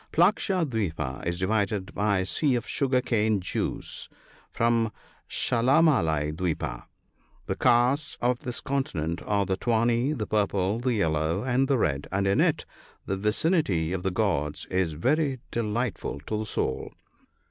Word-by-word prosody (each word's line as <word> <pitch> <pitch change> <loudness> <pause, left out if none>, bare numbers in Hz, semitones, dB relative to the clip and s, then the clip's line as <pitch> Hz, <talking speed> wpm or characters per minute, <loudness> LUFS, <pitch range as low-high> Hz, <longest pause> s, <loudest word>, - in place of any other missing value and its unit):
Flaksha 185 0 +3
kwipa 90 - -3
is 85 0 -1
divided 100 0 -1
by 100 -1 +1
a 95 - 0
sea 135 +7 +2
of 120 - -3
sugar 130 -3 +1
cane 110 -4 +1
juice 90 - -3 0.4
from 115 -1 +1 0.4
Shdl 125 +7 +3
mali 80 - +2
dwipa. 80 0 -3 0.6
The - - -2
castes 125 +5 +2
of 125 0 +1
this 125 -4 -4
continent 85 - -2
are 100 -1 +2
the 95 -1 -1
tawny, 120 +4 +1
the 110 -8 -3
purple, 100 0 0
the 125 0 0
yellow, 80 -1 0
and 130 +1 +1
the 135 -1 +2
red, 70 - 0
and 100 +1 0
in 100 0 +3
it - - +1 0.2
" - - -29
the 95 - -1
vicinity 105 - +1
of 95 - -2
the 95 - 0
gods 90 -7 -1
is 90 -3 +1
very 135 - +1
delightful 115 - -2
to 110 - -4
the 110 - -3
soul." 65 - -2
105 Hz, 155 wpm, -27 LUFS, 95-125 Hz, 0.6 s, Flaksha